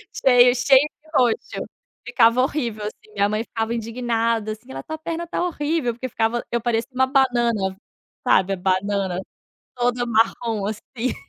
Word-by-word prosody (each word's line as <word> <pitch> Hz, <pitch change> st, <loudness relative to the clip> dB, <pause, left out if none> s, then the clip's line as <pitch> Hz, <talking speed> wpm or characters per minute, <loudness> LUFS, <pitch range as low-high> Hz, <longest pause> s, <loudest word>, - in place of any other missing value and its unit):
Cheio 245 Hz, -2 st, +6 dB
cheio 260 Hz, +2 st, +6 dB, 0.2 s
de 315 Hz, -, -23 dB
roxo. 245 Hz, -3 st, +1 dB, 0.4 s
Ficava 230 Hz, +2 st, +4 dB
horrível, 235 Hz, -6 st, -2 dB
assim. 215 Hz, 0 st, -9 dB
Minha 200 Hz, 0 st, +2 dB
mãe 215 Hz, +1 st, -1 dB
ficava 225 Hz, 0 st, -3 dB
indignada 230 Hz, -1 st, -1 dB
assim, 220 Hz, +4 st, -10 dB
ela: -, -, -6 dB
"Tua 315 Hz, 0 st, -6 dB
perna 330 Hz, +2 st, -4 dB
está 340 Hz, -, -2 dB
horrível", 295 Hz, -6 st, -1 dB
porque 255 Hz, +2 st, -5 dB
ficava 225 Hz, +2 st, 0 dB
eu 235 Hz, -1 st, 0 dB
parecia 235 Hz, +1 st, -1 dB
uma 260 Hz, +1 st, +2 dB
banana, 240 Hz, -8 st, +1 dB, 0.5 s
sabe, 190 Hz, +1 st, +4 dB
a -, -, 0 dB
banana 190 Hz, 0 st, 0 dB, 0.6 s
toda 245 Hz, 0 st, 0 dB
marrom, 225 Hz, -2 st, +1 dB
assim. 230 Hz, +3 st, -4 dB
235 Hz, 155 wpm, -22 LUFS, 215-255 Hz, 0.6 s, Cheio